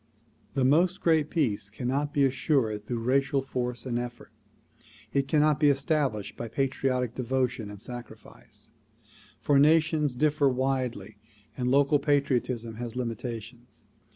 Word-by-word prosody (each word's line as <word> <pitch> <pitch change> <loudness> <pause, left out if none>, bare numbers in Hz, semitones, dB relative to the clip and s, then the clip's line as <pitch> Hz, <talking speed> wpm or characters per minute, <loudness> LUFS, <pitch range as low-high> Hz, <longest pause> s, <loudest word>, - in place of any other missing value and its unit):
The 135 -2 +2
"Most 175 +8 +3
Great 160 -4 +2
Peace" 110 - -1
cannot 130 +7 -2
be 145 - +2
assured 130 -6 0
through 120 -2 -3
racial 135 +3 +2
force 125 -2 -3
and 120 -2 -1
eflfort; 120 0 -7 0.8
it 140 -1 +1
cannot 150 -1 +3
be 145 - +5
established 140 -6 0
by 120 - -5
patriotic 130 -1 -1
devotion 125 -3 -1
and 105 -1 -9
sacrifice; 120 +3 -11 0.7
for 140 -1 +3
nations 155 -2 +3
differ 145 +1 +2
widely 125 -6 -2 0.4
and 125 -1 -1
local 140 +2 +4
patriotism 130 -5 0
has 120 -1 -6
limitations. 120 0 -6
130 Hz, 125 wpm, -27 LUFS, 120-145 Hz, 0.8 s, be